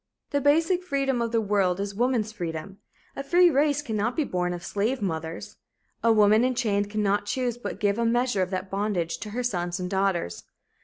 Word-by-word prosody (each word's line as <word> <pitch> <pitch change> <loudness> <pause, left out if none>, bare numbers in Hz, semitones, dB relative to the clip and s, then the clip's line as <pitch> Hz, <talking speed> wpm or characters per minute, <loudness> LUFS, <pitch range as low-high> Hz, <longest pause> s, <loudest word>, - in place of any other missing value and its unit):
The 285 0 +1
basic 325 +6 +3
freedom 275 -6 0
of 230 -1 -1
the 230 - +2
world 195 -4 +1
is 200 0 -3
woman's 230 -1 0
freedom. 175 0 -6 0.4
A - - -3
free 350 +4 +5
race 290 +1 +2
cannot 220 -1 -1
be 310 - +1
born 180 -7 -1
of 175 0 -5
slave 220 +6 -1
mothers. 165 -4 -4 0.5
A 230 - +5
woman 215 +1 +5
enchained 215 -5 0
cannot 205 -1 0
choose 245 +1 -1
but 240 - -6
give 205 +1 +1
a - - +2
measure 240 -3 +1
of 185 - 0
that 185 0 -4
bondage 190 -5 -1
to 215 - -6
her 245 +4 -3
sons 175 -6 -2
and 180 +1 -4
daughters. 190 - -1
210 Hz, 195 wpm, -26 LUFS, 190-250 Hz, 0.5 s, free